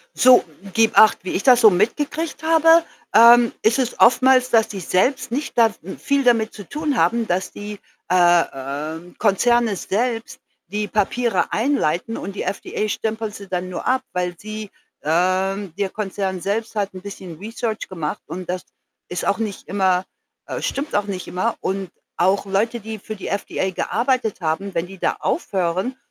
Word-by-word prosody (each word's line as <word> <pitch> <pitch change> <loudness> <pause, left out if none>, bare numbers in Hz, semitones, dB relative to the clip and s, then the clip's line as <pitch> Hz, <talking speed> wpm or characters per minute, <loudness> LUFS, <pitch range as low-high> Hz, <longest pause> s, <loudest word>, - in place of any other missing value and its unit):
So, 255 -1 +6 0.3
gib 225 -1 +2
Acht. 220 - +7
Wie 185 - -4
ich - - -1
das 250 -2 +6
so 220 - +9
mitgekriegt 295 - -1
habe, 325 +1 +5 0.3
ähm, 235 +1 +8
ist 230 +4 +3
es 250 -2 -2
oftmals, 255 +1 +5
dass 225 -2 +4
die 200 - -6
selbst 190 - 0
nicht 280 +3 -3
da 225 -2 +5
n 190 +4 -8
viel 280 -1 0
damit 230 -3 +2
zu 205 - -9
tun 295 -3 -2
haben, 225 +7 +2
dass 185 0 -1
die, 205 0 -8 0.3
äh, 175 -1 +5
ähm, 150 +6 -6
Konzerne 230 +1 +2
selbst 225 +5 -2 0.3
die 210 +3 -3
Papiere 230 +4 0
einleiten 225 - 0
und 200 0 -6
die - - -3
FDA 210 +1 -3
stempelt 220 0 -3
sie 200 - -10
dann 185 -1 -3
nur 180 - -5
ab, 260 +1 +2
weil 180 -1 -2
sie, 215 +1 -7 0.3
ähm 185 +3 0
der 200 -2 -1
Konzern 195 -3 -3
selbst 220 +4 -2
hat 200 -2 -1
'n 185 - -9
bisschen 185 -4 -9
research 220 +1 -4
gemacht 165 -5 -4
und 180 0 -7
das 180 0 -3 0.4
ist 180 - -3
auch 200 - +2
nicht 215 -3 -4
immer, 190 -2 +1 0.4
äh - - -4
stimmt 285 +2 -3
auch 205 0 +1
nicht 190 -3 -5
immer. 220 +6 -1
Und, 190 -1 -3 0.3
auch 190 +3 +2
Leute, 215 +5 0
die 220 0 -7
für 215 +2 -7
die 195 - -7
FDA 195 -1 -2
gearbeitet 240 +3 -1
haben, 185 +4 -2
wenn 165 - 0
die 190 +1 -12
da - - 0
aufhören, 190 - -1
205 Hz, 175 wpm, -21 LUFS, 185-235 Hz, 0.4 s, so